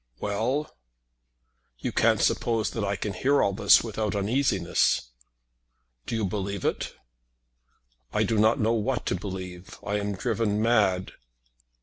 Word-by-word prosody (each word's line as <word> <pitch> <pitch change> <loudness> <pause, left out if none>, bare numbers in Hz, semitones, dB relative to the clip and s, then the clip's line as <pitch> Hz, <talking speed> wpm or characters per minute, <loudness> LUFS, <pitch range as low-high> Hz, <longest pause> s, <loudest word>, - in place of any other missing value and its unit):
"Well!" 115 +9 -2 1.0
"You - - -3
can't - - +3
suppose 115 -2 +1
that 115 - -3
I 100 0 0
can 100 0 -4
hear 140 +9 +2
all 100 - +1
this 100 0 +5
without 110 -2 -2
uneasiness." 100 - +1 1.0
"Do - - -2
you 110 -2 0
believe 100 0 -3
it?" - - -2 1.2
"I - - +1
do 110 -2 +1
not 110 +5 +4
know 115 0 +2
what 120 +3 -1
to - - 0
believe. 90 -1 -7
I 105 +2 0
am 100 -1 -3
driven 110 -1 0
mad." 105 -5 +2
105 Hz, 135 wpm, -26 LUFS, 100-115 Hz, 1.2 s, this